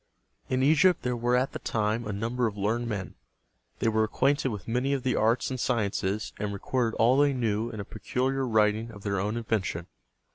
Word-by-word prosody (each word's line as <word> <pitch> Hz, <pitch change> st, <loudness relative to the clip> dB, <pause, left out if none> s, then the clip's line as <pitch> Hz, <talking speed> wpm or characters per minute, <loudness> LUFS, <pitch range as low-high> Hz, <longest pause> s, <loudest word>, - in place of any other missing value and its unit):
In 130 Hz, 0 st, +1 dB
Egypt 160 Hz, +5 st, +4 dB
there 125 Hz, 0 st, 0 dB
were 120 Hz, +1 st, +1 dB
at 125 Hz, +2 st, +1 dB
that -, -, -7 dB
time 110 Hz, +1 st, -1 dB
a -, -, -2 dB
number 115 Hz, +4 st, -1 dB
of 105 Hz, -1 st, -5 dB
learned 115 Hz, +4 st, 0 dB
men. 100 Hz, -4 st, -4 dB, 0.6 s
They -, -, 0 dB
were 110 Hz, 0 st, +3 dB
acquainted 135 Hz, +6 st, +1 dB
with 105 Hz, -5 st, -6 dB
many 125 Hz, +4 st, 0 dB
of 135 Hz, -3 st, -1 dB
the 130 Hz, -, +1 dB
arts 115 Hz, +4 st, +2 dB
and 130 Hz, -, -3 dB
sciences, 105 Hz, -3 st, -1 dB
and 105 Hz, 0 st, -2 dB
recorded 115 Hz, +3 st, -1 dB
all 120 Hz, +5 st, +4 dB
they 145 Hz, -1 st, +4 dB
knew 115 Hz, -2 st, 0 dB
in 110 Hz, -, -7 dB
a 100 Hz, -, -4 dB
peculiar 130 Hz, +1 st, -2 dB
writing 110 Hz, 0 st, +2 dB
of 105 Hz, -3 st, -11 dB
their 100 Hz, -2 st, -1 dB
own 105 Hz, +4 st, -1 dB
invention. 105 Hz, -7 st, -2 dB
115 Hz, 205 wpm, -28 LUFS, 105-125 Hz, 0.6 s, Egypt